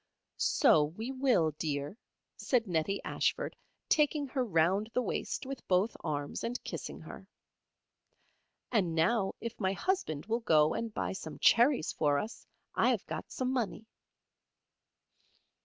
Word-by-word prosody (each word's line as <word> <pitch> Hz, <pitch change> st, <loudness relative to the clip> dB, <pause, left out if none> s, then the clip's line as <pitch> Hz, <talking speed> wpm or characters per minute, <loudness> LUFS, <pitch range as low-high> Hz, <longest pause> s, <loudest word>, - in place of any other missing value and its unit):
"So 150 Hz, -2 st, +4 dB
we 220 Hz, -, -5 dB
will, 255 Hz, -, +2 dB
dear," 145 Hz, +1 st, -2 dB, 0.4 s
said 245 Hz, -3 st, +1 dB
Nettie 180 Hz, +1 st, -1 dB
Ashford, -, -, -1 dB, 0.3 s
taking 300 Hz, -1 st, +2 dB
her 265 Hz, -1 st, -1 dB
round 190 Hz, +1 st, +2 dB
the 250 Hz, -, +3 dB
waist -, -, -3 dB
with 270 Hz, 0 st, -6 dB
both 190 Hz, +5 st, +2 dB
arms 145 Hz, -3 st, -3 dB
and 245 Hz, +2 st, -2 dB
kissing -, -, -6 dB
her. -, -, -10 dB, 1.4 s
"And 185 Hz, -8 st, +1 dB
now 195 Hz, +5 st, +2 dB
if 230 Hz, 0 st, -6 dB
my 190 Hz, -2 st, +1 dB
Husband 195 Hz, -, -1 dB
will 225 Hz, +3 st, 0 dB
go 155 Hz, -8 st, +4 dB
and 230 Hz, -1 st, -3 dB
buy 210 Hz, -, -2 dB
some 190 Hz, -, -7 dB
cherries 245 Hz, -, +4 dB
for 145 Hz, -2 st, +1 dB
us, 215 Hz, +10 st, -5 dB, 0.3 s
I -, -, +3 dB
have -, -, 0 dB
got -, -, -6 dB
some 255 Hz, 0 st, -1 dB
money." 225 Hz, -3 st, -2 dB
210 Hz, 140 wpm, -32 LUFS, 160-245 Hz, 1.4 s, So